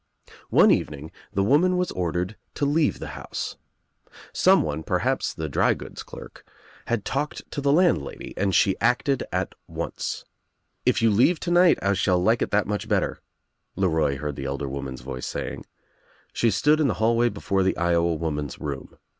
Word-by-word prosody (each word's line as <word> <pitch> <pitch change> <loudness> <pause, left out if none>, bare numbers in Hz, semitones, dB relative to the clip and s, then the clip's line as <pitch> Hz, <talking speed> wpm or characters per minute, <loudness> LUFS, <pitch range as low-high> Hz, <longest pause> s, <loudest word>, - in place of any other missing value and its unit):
One - - +6
evening 75 +2 -1 0.2
the 100 - +1
woman 170 - +3
was 180 0 0
ordered 90 +3 -2 0.2
to 145 - 0
leave 150 +2 +2
the - - -7
house. - - -5 0.8
Someone, 75 0 +3
perhaps - - 0
the 80 - -5
drygoods 70 - 0
clerk, - - -11 0.4
had 120 -4 -1
^talked 145 +2 -2
to 145 - -3
the 140 0 +2
landlady 160 - +1
and 95 -1 0
she 95 -3 +4
acted 130 +2 +2
at - - -2
once. - - -4 0.6
"If - - +3
you 115 - +5
leave 125 - +3
tonight 175 0 +4
I 100 0 +3
shall 90 -1 +2
like 110 +6 +2
it - - 0
that 105 0 +2
much 105 0 -3
better," - - 0 0.6
LeRoy 80 -7 +1
heard 75 +1 -4
the 70 - -5
elder 70 +1 -3
woman's 65 -2 -5
voice 65 0 -6
saying. - - -5 0.7
She 115 - +2
stood 150 +10 +3
In 150 - +3
the 110 - 0
hallway 115 +3 +2
before 100 -2 -1
the 95 0 +1
Iowa 85 -1 +2
woman's 75 -4 -3
room. 70 -2 -6
95 Hz, 165 wpm, -25 LUFS, 75-125 Hz, 0.8 s, One